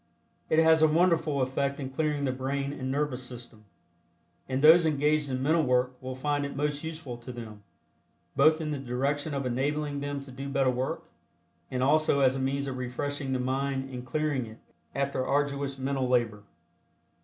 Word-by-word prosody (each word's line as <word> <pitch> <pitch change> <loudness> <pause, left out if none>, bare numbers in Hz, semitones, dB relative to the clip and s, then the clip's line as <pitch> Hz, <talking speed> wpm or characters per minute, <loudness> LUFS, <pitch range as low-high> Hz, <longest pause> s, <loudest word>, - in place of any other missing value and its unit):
It 155 - +2
has 160 0 +6
a 155 - +7
wonderful 160 -3 +2
effect 140 +2 -1
in 135 -2 -5
clearing 150 0 -1
the 135 - +1
brain 135 +2 -2
and 130 -2 -4
nervous 140 -2 -1
system, 120 -3 -10 0.8
and 130 0 0
those 165 +3 +9
engaged 150 -1 +2
in 130 0 -2
mental 160 +4 +3
work 125 -2 +1
will 130 0 -5
find 145 +2 -1
it 140 -1 -4
most 145 +1 -1
useful 155 -6 -6
to 120 +2 -9
them, 110 -4 -9 0.7
both 155 +3 +5
in 155 -2 -3
the 145 - -2
direction 140 +4 -1
of 140 -1 -2
enabling 145 +3 -1
them 145 0 -3
to 140 -1 -11
do 135 +2 -6
better 135 -2 +2
work 125 +1 -2 0.7
and 130 -1 -1
also 145 0 +3
as 130 -1 +4
a - - -2
means 135 +1 -1
of 130 -2 -4
refreshing 135 +2 -3
the 130 - 0
mind 135 +1 -1
and 125 -1 -6
clearing 140 -1 -1
it 110 +1 -11 0.4
after 140 -1 0
arduous 140 0 0
mental 135 -1 -1
labor. 115 -4 +1
140 Hz, 180 wpm, -28 LUFS, 130-145 Hz, 0.8 s, those